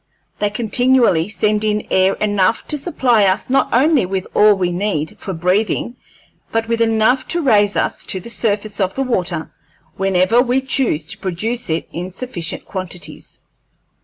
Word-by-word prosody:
They 205 Hz, -, +1 dB
continually 230 Hz, -4 st, +2 dB
send 210 Hz, +1 st, 0 dB
in 210 Hz, -1 st, 0 dB
air 190 Hz, +1 st, +3 dB
enough 205 Hz, 0 st, 0 dB
to 300 Hz, -, 0 dB
supply 245 Hz, -, +2 dB
us 190 Hz, +6 st, 0 dB
not 275 Hz, -, +2 dB
only 275 Hz, +2 st, +3 dB
with 190 Hz, 0 st, -3 dB
all 210 Hz, 0 st, +5 dB
we 180 Hz, -2 st, -1 dB
need 175 Hz, -4 st, -2 dB
for 195 Hz, -, -5 dB
breathing, 190 Hz, +7 st, 0 dB, 0.6 s
but 225 Hz, 0 st, -1 dB
with 230 Hz, 0 st, -1 dB
enough 225 Hz, +3 st, +2 dB
to 345 Hz, -1 st, +1 dB
raise 205 Hz, -6 st, +3 dB
us -, -, -1 dB
to 190 Hz, -, -3 dB
the 185 Hz, -, -11 dB
surface 210 Hz, -2 st, -2 dB
of 190 Hz, -1 st, 0 dB
the 270 Hz, -, 0 dB
water 180 Hz, -10 st, -2 dB, 0.4 s
whenever 195 Hz, +4 st, +3 dB
we 255 Hz, +1 st, +1 dB
choose 255 Hz, -, +1 dB
to -, -, -6 dB
produce 215 Hz, +6 st, -3 dB
it 160 Hz, +1 st, -2 dB
in 175 Hz, +2 st, -4 dB
sufficient 185 Hz, -4 st, -4 dB
quantities." 180 Hz, -4 st, -6 dB
210 Hz, 160 wpm, -18 LUFS, 185-235 Hz, 0.6 s, all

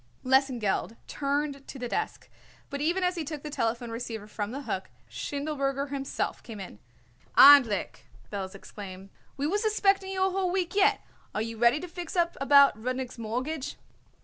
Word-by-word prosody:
Lesengeld 255 Hz, -5 st, +1 dB
turned 280 Hz, 0 st, -2 dB
to -, -, -8 dB
the 250 Hz, -1 st, -4 dB
desk, 430 Hz, -, -3 dB, 0.4 s
but 280 Hz, 0 st, -3 dB
even 345 Hz, +5 st, +1 dB
as 360 Hz, 0 st, +2 dB
he 340 Hz, -3 st, -3 dB
took 300 Hz, -1 st, -6 dB
the 300 Hz, -, -6 dB
telephone 235 Hz, -2 st, -1 dB
receiver 230 Hz, -2 st, -5 dB
from 210 Hz, -1 st, -4 dB
the 275 Hz, +5 st, -6 dB
hook 190 Hz, -7 st, -4 dB, 0.2 s
Schindelberger 280 Hz, -, -3 dB
himself 275 Hz, -1 st, -3 dB
came 225 Hz, -4 st, -9 dB
in. 180 Hz, -, -9 dB, 0.6 s
"Endlich!" 270 Hz, -8 st, +7 dB, 0.3 s
Belz 195 Hz, -1 st, -4 dB
exclaimed. 195 Hz, -1 st, -10 dB, 0.3 s
"We 280 Hz, -, -1 dB
was 410 Hz, +8 st, 0 dB
expecting 395 Hz, -3 st, +2 dB
you 380 Hz, -1 st, 0 dB
a 380 Hz, -, +1 dB
whole 375 Hz, -1 st, 0 dB
week 360 Hz, -2 st, -1 dB
yet. 410 Hz, +1 st, +4 dB, 0.3 s
Are 215 Hz, -, 0 dB
you 230 Hz, 0 st, -5 dB
ready 240 Hz, +5 st, +4 dB
to 360 Hz, -, -6 dB
fix 350 Hz, 0 st, -7 dB
up 345 Hz, -1 st, +2 dB
about 280 Hz, -2 st, +7 dB
Rudnik's 255 Hz, 0 st, -3 dB
mortgage?" 255 Hz, +6 st, -3 dB
275 Hz, 170 wpm, -28 LUFS, 230-320 Hz, 0.6 s, Endlich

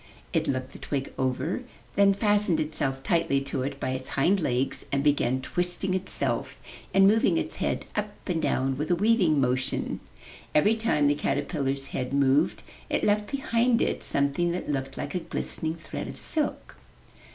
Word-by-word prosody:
It -, -, +1 dB
looked 130 Hz, -1 st, -2 dB
the -, -, -10 dB
twig 135 Hz, -2 st, -3 dB
over, 130 Hz, -, -1 dB, 0.3 s
then 200 Hz, -1 st, +5 dB
fastened 205 Hz, -4 st, +3 dB
itself 135 Hz, -3 st, -1 dB
tightly 150 Hz, -5 st, +2 dB
to 135 Hz, -1 st, -3 dB
it 135 Hz, +1 st, -4 dB
by 130 Hz, -, -2 dB
its 130 Hz, 0 st, -3 dB
hind 180 Hz, +9 st, +3 dB
legs 130 Hz, -4 st, 0 dB
and 140 Hz, 0 st, +1 dB
began 130 Hz, -3 st, +2 dB
twisting 180 Hz, +3 st, -1 dB
itself 190 Hz, 0 st, -1 dB, 0.3 s
and 195 Hz, 0 st, +6 dB
moving 220 Hz, +2 st, +4 dB
its -, -, -1 dB
head -, -, -1 dB
up 210 Hz, 0 st, -1 dB, 0.2 s
and 170 Hz, -4 st, 0 dB
down 135 Hz, -3 st, 0 dB
with 150 Hz, -, -2 dB
a 175 Hz, -, +4 dB
weaving 185 Hz, -6 st, +3 dB
motion. 130 Hz, 0 st, 0 dB, 0.6 s
Every 205 Hz, +9 st, +5 dB
time 220 Hz, -10 st, +1 dB
the 145 Hz, -, +4 dB
caterpillar's 140 Hz, -1 st, -1 dB
head 125 Hz, 0 st, -3 dB
moved, 140 Hz, +2 st, +2 dB, 0.3 s
it -, -, 0 dB
left 210 Hz, 0 st, +2 dB
behind 245 Hz, -3 st, +2 dB
it -, -, 0 dB
something 140 Hz, +5 st, +1 dB
that 175 Hz, -4 st, -3 dB
looked 135 Hz, -1 st, -3 dB
like -, -, -4 dB
a 180 Hz, -, 0 dB
glistening 160 Hz, -1 st, -3 dB
thread 165 Hz, -, -6 dB
of -, -, -8 dB
silk. 305 Hz, -2 st, -2 dB
150 Hz, 170 wpm, -27 LUFS, 135-195 Hz, 0.6 s, and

